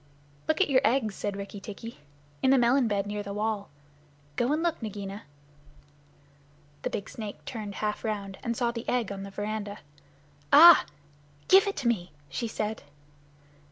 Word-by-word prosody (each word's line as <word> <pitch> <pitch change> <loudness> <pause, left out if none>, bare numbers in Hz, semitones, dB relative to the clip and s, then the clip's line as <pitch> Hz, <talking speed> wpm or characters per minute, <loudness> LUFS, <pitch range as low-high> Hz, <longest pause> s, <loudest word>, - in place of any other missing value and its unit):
"Look 315 - +1
at 390 - +4
your 260 -1 +5
eggs," 240 -5 +2
said 200 0 -4
Rikki 200 +1 -7
tikki, 215 +2 -9 0.4
"in 260 - +3
the 270 - +6
melon 245 +1 +4
bed 200 -2 0
near 205 0 -3
the 200 0 -6
wall. 210 -1 -2 0.7
Go 240 - +1
and 310 +2 +1
look, 340 -5 -1
Nagaina!" 200 -3 -6 1.6
The - - -2
big 200 - -4
snake 215 -3 -8
turned 210 -5 -6
half 210 -1 -2
around, 200 -3 -4
and 235 -1 -2
saw 240 -2 +1
the 235 0 -5
egg 245 -4 0
on 195 -1 -5
the 200 - -7
veranda. 205 0 -4 0.7
"Ah 330 +4 +10
h! - - -22 0.6
Give 385 +2 +7
it 400 - -1
to 265 - -1
me," 185 -7 -1 0.2
she 185 - -3
said. 220 0 -3
215 Hz, 170 wpm, -28 LUFS, 200-245 Hz, 1.6 s, Ah